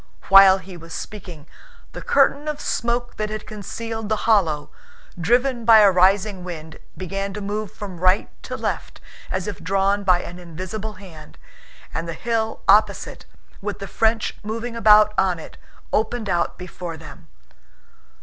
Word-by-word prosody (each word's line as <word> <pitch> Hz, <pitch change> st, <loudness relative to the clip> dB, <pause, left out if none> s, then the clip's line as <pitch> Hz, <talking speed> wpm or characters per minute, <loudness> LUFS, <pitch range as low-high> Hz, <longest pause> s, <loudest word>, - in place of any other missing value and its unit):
While 195 Hz, 0 st, +9 dB
he 185 Hz, -1 st, -11 dB
was 165 Hz, -1 st, -9 dB
speaking, 175 Hz, -8 st, -8 dB, 0.5 s
the -, -, -8 dB
curtain 290 Hz, +2 st, +2 dB
of 300 Hz, -1 st, -3 dB
smoke 240 Hz, -2 st, -2 dB
that 215 Hz, 0 st, -2 dB
had 215 Hz, 0 st, -5 dB
concealed 220 Hz, +1 st, -6 dB
the 215 Hz, -, +2 dB
hollow, 165 Hz, -10 st, +2 dB, 0.4 s
driven 240 Hz, +7 st, +1 dB
by 225 Hz, -1 st, +8 dB
a 200 Hz, -2 st, +7 dB
rising 190 Hz, +1 st, +3 dB
wind, 160 Hz, -3 st, -8 dB, 0.2 s
began 195 Hz, +2 st, -4 dB
to -, -, -4 dB
move 210 Hz, 0 st, -4 dB
from 190 Hz, -4 st, -8 dB
right 185 Hz, +2 st, +3 dB, 0.2 s
to -, -, -5 dB
left -, -, -4 dB, 0.3 s
as 185 Hz, -1 st, -2 dB
if 205 Hz, -, -5 dB
drawn 195 Hz, +3 st, +1 dB
by 180 Hz, -2 st, +3 dB
an 175 Hz, +1 st, -9 dB
invisible 185 Hz, +5 st, -6 dB
hand, 170 Hz, -6 st, -13 dB, 0.6 s
and 165 Hz, +1 st, -3 dB
the -, -, -3 dB
hill 225 Hz, +3 st, -2 dB
opposite, 210 Hz, +2 st, +3 dB, 0.4 s
with 205 Hz, 0 st, -4 dB
the 200 Hz, -, -7 dB
French 225 Hz, +1 st, 0 dB
moving 230 Hz, +3 st, -4 dB
about 215 Hz, -1 st, +6 dB
on 190 Hz, -2 st, +2 dB
it, 160 Hz, -, -11 dB, 0.4 s
opened 220 Hz, +1 st, 0 dB
out 175 Hz, -1 st, 0 dB
before 175 Hz, -2 st, -7 dB
them. 155 Hz, -, -13 dB
200 Hz, 155 wpm, -22 LUFS, 180-220 Hz, 0.6 s, While